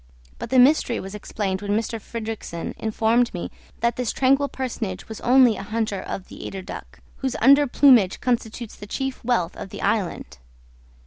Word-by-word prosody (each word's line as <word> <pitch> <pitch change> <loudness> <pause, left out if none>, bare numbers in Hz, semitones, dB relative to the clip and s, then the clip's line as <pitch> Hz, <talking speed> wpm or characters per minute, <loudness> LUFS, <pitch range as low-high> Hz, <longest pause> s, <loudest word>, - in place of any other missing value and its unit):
But - - -6
the 260 - +2
mystery 250 -2 +4
was 195 +1 -7
explained 200 -2 -3
when 205 0 -1
M. - - +3
Fridrikssen 225 -5 -5
informed 225 +2 +1
me 175 - -5 0.3
that 235 0 +1
this 250 -3 -1
tranquil 275 +2 +2
personage 230 -7 -4
was 220 - -8
only 250 -3 +5
a - - -5
hunter 215 -1 -2
of 190 - -6
the - - -10
eider 190 -1 -6
duck, - - -10 0.2
whose 265 -2 -2
under 280 +4 +6
plumage 245 -8 +5
constitutes 235 -2 -2
the 205 - -10
chief 270 +4 -4
wealth 225 -8 0
of - - -7
the - - -8
island. 195 - -2
225 Hz, 175 wpm, -23 LUFS, 205-250 Hz, 0.3 s, under